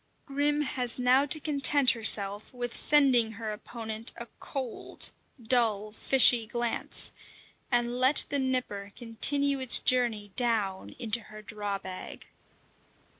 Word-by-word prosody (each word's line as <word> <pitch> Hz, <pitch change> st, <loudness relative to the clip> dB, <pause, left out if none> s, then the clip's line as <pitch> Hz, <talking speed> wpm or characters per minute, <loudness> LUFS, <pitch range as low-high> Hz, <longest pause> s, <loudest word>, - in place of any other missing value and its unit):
Grim 290 Hz, +1 st, -2 dB
has 250 Hz, -3 st, -4 dB
now 255 Hz, +3 st, +1 dB
to 310 Hz, -, +4 dB
content 285 Hz, -2 st, +2 dB
herself 205 Hz, -3 st, +1 dB
with 245 Hz, -2 st, -7 dB
sending 260 Hz, -7 st, +3 dB
her 220 Hz, 0 st, -7 dB
opponent 220 Hz, +1 st, -5 dB
a 235 Hz, -, -8 dB
cold, 260 Hz, -4 st, -3 dB, 0.3 s
dull, 220 Hz, -3 st, 0 dB
fishy 240 Hz, 0 st, +3 dB
glance, 240 Hz, 0 st, +1 dB, 0.6 s
and 240 Hz, 0 st, -2 dB
let 260 Hz, +3 st, +5 dB
the 285 Hz, -, -1 dB
Nipper 250 Hz, -7 st, -4 dB
continue 275 Hz, +4 st, 0 dB
its 260 Hz, -2 st, +5 dB
journey 230 Hz, -5 st, -1 dB
down 215 Hz, -6 st, -2 dB
into 235 Hz, -2 st, +1 dB
her 215 Hz, 0 st, -13 dB
draw 205 Hz, -1 st, -6 dB
bag. 190 Hz, -1 st, -10 dB
240 Hz, 125 wpm, -27 LUFS, 215-260 Hz, 0.6 s, let